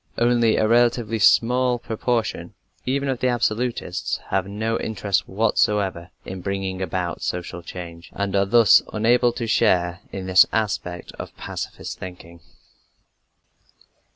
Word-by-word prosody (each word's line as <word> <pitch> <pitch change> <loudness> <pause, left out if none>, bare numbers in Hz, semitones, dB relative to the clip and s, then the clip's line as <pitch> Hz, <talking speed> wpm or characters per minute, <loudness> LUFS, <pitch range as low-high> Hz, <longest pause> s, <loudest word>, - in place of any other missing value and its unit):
Only 120 -2 +3
a 110 - +2
relatively 115 -1 +2
small 125 +3 +4
proportion, 115 0 -2 0.3
even 140 +2 0
of 130 -3 -1
the 130 - +1
absolutists, 120 -5 -1
have 95 -1 0
no 110 +3 -2
interest 100 -2 -1
whatever 100 -4 0 0.2
in 95 -1 -7
bringing 95 -1 -3
about 90 -3 -3
social 90 0 -4
change, 85 -1 -9
and 100 -1 -2
are 100 0 +2
thus 115 -1 +6
unable 120 +3 +3
to 120 - -4
share 90 -5 +2
in 95 -1 -5
this 95 0 +6
aspect 95 -5 -2
of - - -8
pacifist - - -6
thinking. 85 -2 -10
105 Hz, 125 wpm, -23 LUFS, 95-120 Hz, 0.3 s, thus